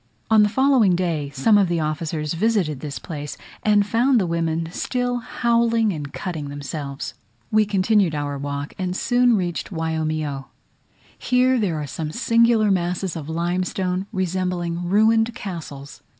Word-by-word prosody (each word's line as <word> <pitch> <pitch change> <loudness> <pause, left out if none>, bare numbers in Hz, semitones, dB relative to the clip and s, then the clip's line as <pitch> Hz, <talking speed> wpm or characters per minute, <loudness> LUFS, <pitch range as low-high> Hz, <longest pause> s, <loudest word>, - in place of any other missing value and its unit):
On 220 -1 +7
the 210 - +4
following 255 -6 +4
day 165 -5 -1
some 205 +11 +4
of 195 - +3
the 170 -1 0
officers 155 0 -2
visited 180 - 0
this 145 0 -5
place, 150 -4 -6 0.2
and 210 -1 +3
found 240 +4 +3
the 190 - +1
women 165 -1 -1
still 245 +5 -1
howling 230 -2 +1
and 145 -3 -6
cutting 160 -6 -5
themselves. 140 0 -5 0.4
We 215 -1 +3
continued 195 -3 +2
our 145 -1 -3
walk, 145 +1 -4
and 185 -1 -2
soon 245 -2 +3
reached 175 -3 -3
Waiomio. 155 -4 -2 0.7
Here 255 0 +2
there 175 -8 0
are 150 - -3
some 150 +3 -5
singular 230 -1 +3
masses 180 0 -1
of 160 -2 -6
limestone, 180 +3 -1
resembling 180 -3 -2
ruined 225 +3 +3
castles. 150 -7 -8
180 Hz, 145 wpm, -22 LUFS, 155-215 Hz, 0.7 s, On